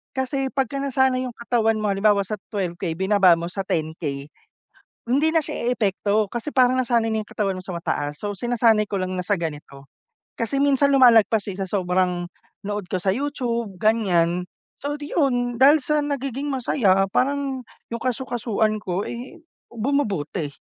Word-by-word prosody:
kasi 265 +1 -1
pagkanasanay 265 -2 +1
yung 235 - -12
katawan 225 -2 +1
mo 210 -1 0
halimbawa 200 0 +3
sa 205 - -5 0.2
12K 175 -4 -3
binaba 190 -2 +5
mo 170 - -4
sa 195 - -3
10K. 155 -3 -2 0.8
Hindi 295 +6 +3
na 325 - +4
siya 245 -3 -2
eepekto 205 -1 +1
kasi 240 +5 -4
parang 255 -1 +4
nasanay 235 -3 +1
na 220 -1 -1
yung - - -45
katawan 195 -3 -1
mo 185 - -8
sa 185 - -6
mataas 145 -4 -3
so 205 -1 -4
sinasanay 230 -2 +2
ko 200 -2 -3
lang 185 0 -3
na 180 - -3
sa 195 -2 0
ganito. 145 -3 -7 0.4
Kasi 230 +4 -3
minsan 280 0 +3
lumalagpas 225 -4 +5
din 195 -1 -6
sa 190 - -3
sobrang 180 -2 0 0.4
nood 205 -2 -4
ko - - -1
sa 190 +1 0
YouTube 235 -6 -2
ganyan, 180 -5 +1 0.3
so 290 +1 -3
iyon, 255 -5 -1
dahil 290 +3 +7
sa 300 0 +1
nagiging 275 0 -3
masaya 205 -7 +2
parang, 275 0 0 0.3
yung 235 - -3
kasu-kasuan 235 -4 -1
ko 185 +1 -2
ay 255 +8 -8 0.3
bumubuti. 205 - -1
220 Hz, 160 wpm, -23 LUFS, 185-255 Hz, 0.8 s, dahil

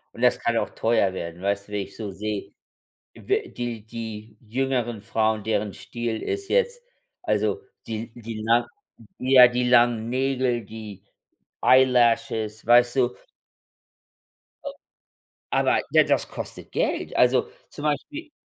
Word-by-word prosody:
Und - - -9
das 125 0 +4
kann 120 - 0
auch - - 0
teuer 110 -4 +1
werden. 85 -1 -6
Weißt 100 +1 -1
du, 105 - -12
wie - - 0
ich 100 - -14
so 110 -3 -5
sehe, 105 +1 -5 0.6
wä 410 0 -2
die 120 -3 -5
die 110 -1 -8
jüngeren 120 -2 -1
Frauen, 110 0 0
deren 105 -1 -1
Stil 120 -2 -4
ist 395 0 -3
jetzt 485 0 +1 0.4
also, 425 - 0 0.3
die 115 +1 -4
die 115 -2 -7
nach 115 +2 +3 0.6
ja 130 -1 +8
,die 125 0 0
langen 120 -2 +3
Nägel, 130 -2 0
die 105 -2 -10 0.6
eyelashes, 115 -4 +3
weißt 120 +2 +5
du. 125 -1 +2 2.4
Aber - - +3
ja, - - +6
das - - +1
kostet - - -8
Geld. - - -1
Also, 125 0 +3 0.2
zum 145 - -9
Beispiel 300 - -3
120 Hz, 135 wpm, -24 LUFS, 110-125 Hz, 2.4 s, ja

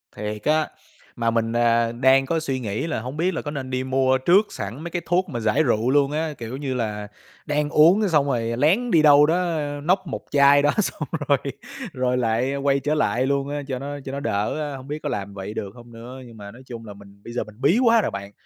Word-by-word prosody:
Thiệt 105 0 -5
á. 155 +1 +2 0.5
Mà 115 -1 +1
mình, 115 0 0
à, 115 -1 +2
đang 130 +3 +3
có 165 +4 0
suy 135 -4 -3
nghĩ 110 +7 -3
là 150 - -2
hổng 130 +5 -7
biết 180 +3 +1
là - - -3
có 145 - -5
nên 135 -3 -5
đi 130 0 -2
mua 130 0 +2
trước 185 +10 +4
sẵn 115 +11 -6
mấy 170 - -6
cái 175 - -2
thuốc 180 +1 +1
mà 120 -4 -4
giải 110 +7 +2
rượu 120 -1 +1
luôn 140 0 +3
á, 155 0 -2
kiểu 120 +3 -6
như 135 -2 -3
là, 105 -4 -3 0.4
đang 150 0 0
uống 170 +8 +5
cái 205 - +1
xong 150 -4 +3
rồi 115 -3 -1
lén 195 - +2
đi 160 - +5
đâu 145 -1 +7
đó 170 +1 0 0.3
nốc 185 +2 +1
một - - -5
chai 140 0 +6
đó 145 +1 +3
xong 150 -6 -4 0.2
rồi 140 -1 +4 0.6
rồi 125 -1 0
lại 125 +3 0
quay 140 0 +1
trở 150 +2 -1
lại 125 -2 +1
luôn 140 0 0
á 145 0 -3
cho 130 -2 -3
nó 145 +1 -6
cho 135 - -5
nó 140 - -4
đỡ, 115 +6 -2
a, - - -6
hông 130 +1 -12
biết 150 +1 -4
có 150 - -2
làm 100 -4 -4
vậy 100 +1 -6
được 100 -2 -6
hông 120 -1 -14
nữa. 120 +3 -10
Nhưng 115 -2 -13
mà 100 0 -9
nói 125 - -14
chung 115 -2 -9
là 105 - -9
mình 100 0 -17
bây 120 - -9
giờ 125 - -1
mình 110 +3 -16
bí 165 - +4
quá 230 -1 +5
rồi - - -2
bạn, 100 0 -7
135 Hz, 255 wpm, -23 LUFS, 115-150 Hz, 0.6 s, đâu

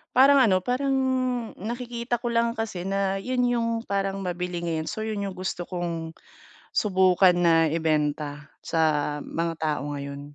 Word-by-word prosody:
Parang 275 +2 +7
ano, 205 -7 +5
parang 270 +2 +1 0.7
nakikita 240 0 -3
ko - - -3
lang 230 0 +3
kasi 220 -5 -3
na 195 0 +1 0.3
'yon 255 -1 +1
yung 230 -1 0 0.2
parang 195 0 0
mabili 180 0 -3
ngayon. 160 -2 -2
So - - -5
'yon 215 -2 -3
yung 195 -2 -5
gusto 185 -1 -3
kong, 170 -2 -3 0.7
subukan 185 -3 +4
na 170 -1 +5 0.2
ibenta 150 -2 0 0.4
sa 165 - +1 0.6
mga 165 0 0
tao 150 -3 0
ngayon. 140 0 -6
185 Hz, 145 wpm, -26 LUFS, 165-230 Hz, 0.7 s, Parang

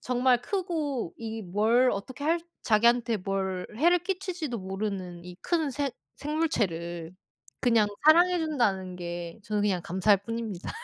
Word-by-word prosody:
정말 250 0 +2
크고 315 - -2
이 225 -1 -5
뭘 220 +7 +3
어떻게 255 +8 -5
할 335 +2 +2 0.2
자기한테 235 +1 +3
뭘 190 -1 -2
해를 345 +7 +4
끼칠지도 355 - -3
모르는 190 -2 -4
이 180 0 -9
큰 320 -5 0
생 285 +1 -1 0.3
생물체를 180 - -2 0.5
그냥 230 -4 +4 0.2
사랑해 350 +3 +6
준다는 205 - 0
게 175 0 -6
저는 210 -1 -1
그냥 190 -4 +1
감사할 190 +3 +3
뿐입니다. 230 -5 -4
230 Hz, 280 characters per minute, -28 LUFS, 190-290 Hz, 0.5 s, 사랑해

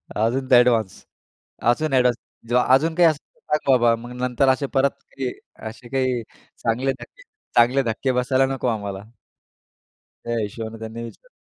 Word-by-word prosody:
अजून 125 +5 0
ते 125 - +9
एडव्हान्स 115 -5 +1 0.7
अजून 155 +3 0
एडव्हान्स 125 -2 +4 0.3
जेव्हा 125 +1 +3
अजून 160 +4 +2
काही 175 0 +5
असेल 155 -3 -3
तर - - -31 0.2
सांग 140 - -2
बाबा. 120 -2 +4
मग 120 +2 -10
नंतर 125 +2 +1
असे 135 +2 +2
परत, 135 +1 +2 0.3
की 130 -2 -2 0.4
असे 120 +2 -12
काही 130 -2 0 0.4
चांगले 125 +4 0
धक्के, - - -14 0.3
चांगले 125 +3 +4
धक्के 120 +3 -1
बसायला 130 +1 +2
नको 135 -2 -2
आम्हाला. 100 -3 -3 1.2
त्या 120 0 -2
हिशोबाने 110 +2 -6
त्यांनी 110 +1 -6
विचारलं. 310 - -11
125 Hz, 160 wpm, -22 LUFS, 115-135 Hz, 1.2 s, ते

